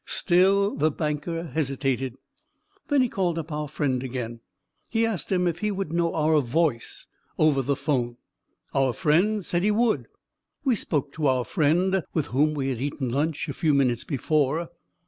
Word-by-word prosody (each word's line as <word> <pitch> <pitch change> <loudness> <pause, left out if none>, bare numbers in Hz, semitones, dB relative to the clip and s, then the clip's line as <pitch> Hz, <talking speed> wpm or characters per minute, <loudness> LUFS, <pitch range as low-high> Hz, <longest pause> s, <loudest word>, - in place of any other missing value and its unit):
Still 195 +3 +3
the 155 +2 +2
banker 155 +2 -3
hesitated. 135 -5 -2 0.7
Then 290 -4 +3
he - - +2
called 180 -6 -1
up 160 -1 -5
our 150 0 -3
friend 135 -3 -1
again. 120 -3 -5 0.5
He 225 0 +2
asked 220 -6 -3
him 180 -1 +2
if 170 -1 -1
he 210 - 0
would 195 -5 -3
know 170 -1 +1
our 155 -1 +3
voice 135 -1 -1 0.3
over 150 -3 +3
the 140 +2 0
phone. 130 -4 -1 0.6
Our 135 -2 +2
friend 190 - +2
said 175 - 0
he 205 - +2
would. 220 +1 +1 0.6
We 260 -4 +3
spoke 145 -7 -1
to 155 -3 0
our 130 -2 +2
friend, 180 +4 +2
with 155 -4 +1
whom 150 +4 +2
we 135 -2 -1
had 125 -2 -3
eaten 140 -2 -2
lunch 145 +3 -1
a 145 - -3
few 150 +1 +1
minutes 125 -4 +2
before. 155 +3 0
155 Hz, 170 wpm, -25 LUFS, 135-175 Hz, 0.7 s, Still